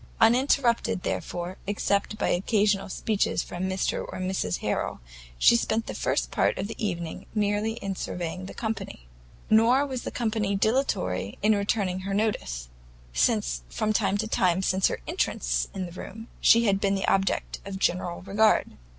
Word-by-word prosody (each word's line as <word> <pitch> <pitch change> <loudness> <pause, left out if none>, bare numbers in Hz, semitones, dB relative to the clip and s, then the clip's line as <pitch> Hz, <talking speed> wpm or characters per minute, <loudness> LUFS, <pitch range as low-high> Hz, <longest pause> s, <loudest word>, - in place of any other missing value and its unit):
Uninterrupted, 240 -3 +3
therefore, 175 +2 -3
except 205 +1 0
by - - 0
occasional 200 +1 +1
speeches 210 +2 0
from 175 +1 -4
Mr 190 0 -1
and 185 - -3
Mrs 140 - -1
Harrel, - - -2 0.4
she 235 - +6
spent 225 -1 0
the - - -5
first - - -1
part - - +1
of 190 - -2
the 225 - -7
evening 170 -5 -3
merely 210 +1 +1
in 195 -4 -4
surveying 180 +1 -4
the - - -9
company. 220 - -4 0.4
Nor 235 +6 +5
was 260 -3 -4
the - - -4
company 220 -4 -1
dilatory 195 - 0
in 215 +1 +5
returning 200 -2 0
her 195 +1 -3
notice, 65 - -1 0.5
since - - +1
from 215 - -1
the 210 0 +1
time 185 -4 +2
of 190 0 +2
her - - -3
entrance - - 0
into 185 -2 -5
the 175 - -8
room, 225 +3 -9
she 230 +1 +6
had 195 -2 +2
been 200 0 +2
the 195 - -2
object 195 0 +1
of 195 -1 -6
general 180 -2 -1
regard. 205 +3 +3
200 Hz, 160 wpm, -27 LUFS, 185-220 Hz, 0.5 s, she